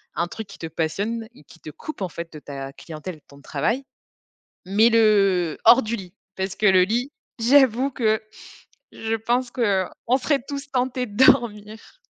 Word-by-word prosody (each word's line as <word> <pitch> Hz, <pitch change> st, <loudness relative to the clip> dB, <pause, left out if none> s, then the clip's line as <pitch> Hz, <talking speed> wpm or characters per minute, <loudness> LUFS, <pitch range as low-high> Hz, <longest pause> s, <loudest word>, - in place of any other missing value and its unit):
Un 170 Hz, -, 0 dB
truc 220 Hz, +4 st, -8 dB
qui 200 Hz, -2 st, -13 dB
te 165 Hz, -, -6 dB
passionne 200 Hz, +9 st, -3 dB
et -, -, -17 dB
qui 165 Hz, -, -18 dB
te 155 Hz, -, -10 dB
coupe 310 Hz, -, -9 dB
en 190 Hz, -, 0 dB
fait 170 Hz, -1 st, -8 dB
de 155 Hz, -, -9 dB
ta 135 Hz, -2 st, -7 dB
clientèle 160 Hz, +4 st, -8 dB
et -, -, -16 dB
de 150 Hz, -, -26 dB
ton 140 Hz, 0 st, -17 dB
travail, 185 Hz, -, -1 dB, 0.8 s
mais 210 Hz, +5 st, +4 dB
le 195 Hz, -7 st, +3 dB
hors 255 Hz, +3 st, +8 dB
du 225 Hz, +2 st, -2 dB
lit, 185 Hz, -3 st, -10 dB, 0.2 s
parce 190 Hz, 0 st, -3 dB
que 215 Hz, -, -1 dB
le 185 Hz, -1 st, +6 dB
lit, 240 Hz, +8 st, -1 dB, 0.3 s
j'avoue 260 Hz, +1 st, +4 dB
que, 220 Hz, -4 st, +1 dB, 0.7 s
je 225 Hz, 0 st, -2 dB
pense 240 Hz, +3 st, -1 dB
qu'on 225 Hz, +1 st, 0 dB
serait 275 Hz, +1 st, 0 dB
tous 280 Hz, 0 st, -6 dB
tentés 255 Hz, 0 st, -1 dB
de 225 Hz, +4 st, +3 dB
dormir. 220 Hz, -, +1 dB
215 Hz, 185 wpm, -23 LUFS, 180-240 Hz, 0.8 s, hors